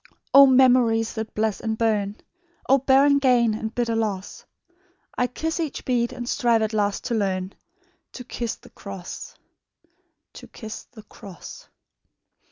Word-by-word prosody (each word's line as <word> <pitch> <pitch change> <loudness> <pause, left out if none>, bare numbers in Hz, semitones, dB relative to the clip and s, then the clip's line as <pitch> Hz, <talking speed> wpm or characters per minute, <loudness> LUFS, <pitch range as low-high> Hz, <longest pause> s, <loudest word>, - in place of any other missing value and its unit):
"O 275 0 +9
memories 250 -4 +4
that 220 -1 -6
bless 215 -1 0
and 220 -1 -3
burn! 210 -3 0 0.5
O 270 +1 +5
barren 275 +2 +4
gain 245 -4 +3
and 220 +1 -5
bitter 235 -2 0
loss! 205 -4 -3 0.7
I 250 - +1
kiss 320 +7 -3
each 320 -4 -4
bead, 240 -2 0
and 240 -1 -7
strive 235 -2 +2
at 220 0 -2
last 205 -2 0
to 245 - -3
learn 190 -3 -1 0.6
To 250 - -8
kiss 235 -2 -4
the - - -19
cross... 195 -3 -9 1.0
to - - -12
kiss 220 -2 -9
the 220 -3 -15
cross." 195 -3 -12
225 Hz, 145 wpm, -24 LUFS, 215-250 Hz, 1.0 s, O